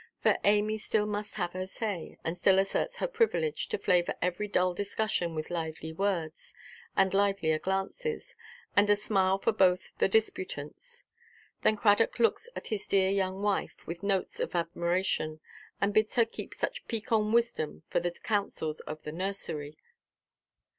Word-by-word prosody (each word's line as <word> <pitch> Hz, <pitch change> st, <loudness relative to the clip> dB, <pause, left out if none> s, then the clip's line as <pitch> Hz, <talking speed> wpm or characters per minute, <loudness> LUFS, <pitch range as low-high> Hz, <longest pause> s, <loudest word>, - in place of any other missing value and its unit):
For -, -, +3 dB
Amy 210 Hz, +1 st, +3 dB
still 210 Hz, 0 st, +1 dB
must 210 Hz, 0 st, -4 dB
have 175 Hz, -, -2 dB
her 185 Hz, 0 st, -3 dB
say, 195 Hz, -4 st, -4 dB
and 165 Hz, -, -2 dB
still 190 Hz, +1 st, +4 dB
asserts 195 Hz, -, +1 dB
her -, -, 0 dB
privilege 460 Hz, -1 st, +1 dB
to 435 Hz, -, -1 dB
flavour 175 Hz, -, +2 dB
every 180 Hz, +4 st, -1 dB
dull 185 Hz, -2 st, +2 dB
discussion 200 Hz, -3 st, -1 dB
with 155 Hz, +2 st, -4 dB
lively 160 Hz, -1 st, -4 dB
words, 170 Hz, -4 st, -2 dB, 0.4 s
and 190 Hz, -1 st, +4 dB
livelier 195 Hz, -6 st, +2 dB
glances, 195 Hz, -, -2 dB, 0.4 s
and 205 Hz, +1 st, +5 dB
a 205 Hz, -, +7 dB
smile 195 Hz, -2 st, +2 dB
for -, -, +1 dB
both 185 Hz, -4 st, +3 dB
the -, -, +4 dB
disputants. 220 Hz, -, -2 dB, 0.6 s
Then 215 Hz, -, +3 dB
Cradock 210 Hz, +1 st, +3 dB
looks 235 Hz, -, +2 dB
at -, -, -4 dB
his 210 Hz, -2 st, -3 dB
dear 190 Hz, -1 st, +3 dB
young 190 Hz, 0 st, 0 dB
wife 205 Hz, -2 st, -1 dB
with 170 Hz, +1 st, -6 dB
notes 195 Hz, -2 st, 0 dB
of -, -, -2 dB
admiration, 170 Hz, -2 st, 0 dB, 0.4 s
and 200 Hz, +1 st, +1 dB
bids 215 Hz, 0 st, +2 dB
her 235 Hz, -, +5 dB
keep 225 Hz, -, -8 dB
such -, -, -3 dB
piquant 220 Hz, -2 st, 0 dB
wisdom 230 Hz, -10 st, +1 dB
for -, -, +1 dB
the 175 Hz, +1 st, -1 dB
councils 175 Hz, -4 st, -2 dB
of 155 Hz, 0 st, -7 dB
the 150 Hz, -, -5 dB
nursery. 160 Hz, -4 st, -3 dB
195 Hz, 160 wpm, -30 LUFS, 175-210 Hz, 0.6 s, a